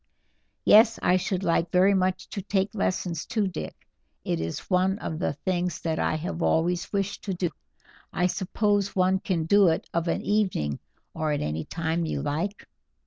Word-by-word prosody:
"Yes, 225 +1 +7
I 180 - +4
should 185 0 -2
like 170 -1 +1
very 185 +2 +5
much 185 -1 0
to 200 - -4
take 195 +1 -1
lessons 180 -5 -1
too, 215 -4 -1
Dick; 180 -4 -5 0.5
it 85 - -1
is 80 0 -4
one 190 +1 +2
of 160 -7 -5
the 145 - 0
things 175 +2 -2
that 160 -1 -1
I - - +1
have 165 +2 -4
always 175 +2 +1
wished 200 -1 -2
to 195 -3 -2
do. 175 -1 -1 0.6
I 180 - +1
suppose 200 +2 0
one 185 0 +3
can 175 -5 -1
do 200 +3 +5
it 160 - 0
of 170 0 0
an 165 - -1
evening, 185 - 0 0.3
or 155 -1 -1
any 80 - -2
time 165 0 -2
you 140 - -2
like?" 165 +8 -3
180 Hz, 175 wpm, -26 LUFS, 160-195 Hz, 0.6 s, Yes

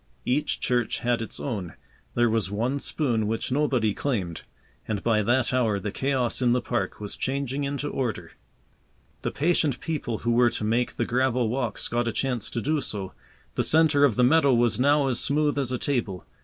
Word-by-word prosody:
Each 135 +4 0
church 120 -3 0
had 120 -1 +1
its 115 - -5
own. 100 - -4 0.4
There 120 0 +4
was 110 -3 0
one 120 +7 -1
spoon 120 -7 -1
which 115 +3 -2
nobody 130 -7 +1
claimed. 95 - -2 0.5
And 105 -2 -2
by 110 -2 +3
that 120 +4 +1
hour 115 -5 +2
the 105 +1 -4
chaos 130 0 0
in 120 -1 +3
the 125 - +2
park 120 0 -2
was 105 -1 -5
changing 140 +1 -2
into 140 +1 -3
order. 125 -7 -3 0.9
The - - -1
patient 150 -4 +1
people 145 -8 -3
who 120 - -1
were 120 +1 +4
to 110 - -4
make 115 +3 0
the 115 - -1
gravel 125 -1 +1
walks 120 -3 -2
got 120 0 -1
a - - +1
chance 125 -2 -2
to 120 - -3
do 150 +4 0
so. 95 -6 -4 0.4
The - - 0
centre 155 -2 +4
of 135 -7 +4
the 125 - +3
meadow 140 0 +5
was 120 0 +2
now 145 +2 +4
as 125 -2 0
smooth 145 0 +1
as 130 -3 -1
a 125 - 0
table. 115 - -2
125 Hz, 195 wpm, -26 LUFS, 115-140 Hz, 0.9 s, meadow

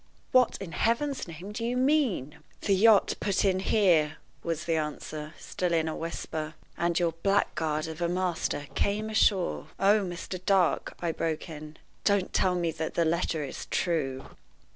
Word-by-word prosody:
What, 255 -2 +4
in 195 -4 -6
Heaven's 260 - 0
name, 170 +5 -8
do 220 +2 -4
you 240 +2 0
mean?" 255 - +1 0.2
"The 200 - +2
yacht 210 +2 +5
put 200 0 +1
in 185 -1 +3
here," 175 -7 +3 0.2
was 165 -1 -2
the 165 -1 +1
answer, 155 0 -4
still 180 -2 -2
in 160 -1 +2
a 160 - -2
whisper, 160 -1 -4 0.2
"and 170 0 0
your 170 -2 +2
blackguard 160 -6 +1
of 160 +1 -7
a 170 - +1
master 175 -5 -1
came 215 +2 0
ashore 200 -4 +2
" - - -30
"Oh, 215 +1 +6
Mr. 180 0 -5
Dark," 190 -3 +2
I 170 -1 0
broke 160 +1 -3
in, 155 0 -9 0.3
"don't 200 -2 +2
tell 185 -1 +2
me 170 -2 0
that 160 0 -4
the 170 - +3
letter 160 -1 0
is 135 - -6
true!" 140 -7 -1
175 Hz, 170 wpm, -28 LUFS, 160-200 Hz, 0.3 s, Oh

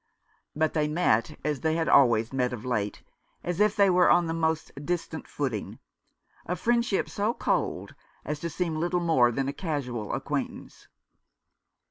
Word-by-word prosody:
But 155 +1 +1
they 150 -2 +1
met 150 -8 +1
as 150 -3 0
they 160 +4 0
had 165 -1 0
always 120 -3 +4
met 125 -2 0
of 120 0 -7
late, 105 -5 -2 0.4
as 175 +1 -3
if 210 0 +3
they 200 -1 +5
were 180 -1 +4
on 175 0 +5
the 165 - -2
most 160 -1 -1
distant 165 -1 -3
footing 130 -8 -3 0.4
— - - -34
a 180 - -1
friend 235 +4 +2
ship 205 -5 -1
so 210 +4 -1
cold - - -1 0.3
as 150 -1 -3
to 170 - -3
seem 165 0 -2
little 175 +2 0
more 160 -9 +3
than 135 +3 -1
a 140 - -2
casual 130 - -3
acquaintance. - - -5
160 Hz, 170 wpm, -27 LUFS, 130-175 Hz, 0.4 s, they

